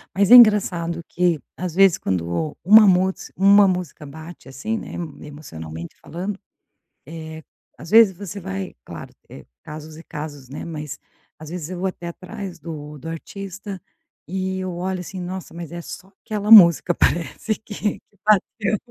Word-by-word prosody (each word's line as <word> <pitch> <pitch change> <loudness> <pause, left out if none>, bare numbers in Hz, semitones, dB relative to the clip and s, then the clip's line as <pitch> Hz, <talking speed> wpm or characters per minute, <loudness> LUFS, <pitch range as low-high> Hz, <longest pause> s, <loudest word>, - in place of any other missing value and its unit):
mas 200 +2 +2
é 250 - +12
engraçado 180 -7 +5
que, 175 -3 +1 0.2
às 180 -2 -4
vezes 195 -2 +5
quando 90 - -2
uma 210 +3 +8
musica 190 +1 +1
uma 200 +1 +6
música 180 -5 -3
bate 160 +1 -11
assim 215 +12 -4
né, - - -8 0.3
emocionalmente 85 - -9
falando, 185 +4 -5 1.2
eh, - - -20
às 165 - -10
vezes 220 -4 +6
você 200 +1 -7
vai, 95 - -5
claro, - - -9 0.2
eh, - - -12 0.2
casos 155 0 -10
e 165 - -11
casos, 145 -4 -8
né, 140 - -7
mas 150 -4 -6 0.4
às 155 -1 -10
vezes 175 -2 -6
eu 185 - -5
vou 190 - -1
até 175 -2 -5
atrás 185 +1 -8
do 150 -2 -8
do 150 - -9
artista, 195 +3 -7 0.5
e 190 +1 -3
eu 185 -2 -4
olho 185 +1 -3
assim, 185 +1 -7
"nossa 180 0 -7
mas 170 -1 -8
é 175 - -6
só 190 - -10 0.2
aquela 210 -1 -3
música 175 -4 +8
parece 175 +7 0
que 210 -1 -4
que 205 - -35
bateu". 210 0 +2
180 Hz, 160 wpm, -22 LUFS, 155-195 Hz, 1.2 s, é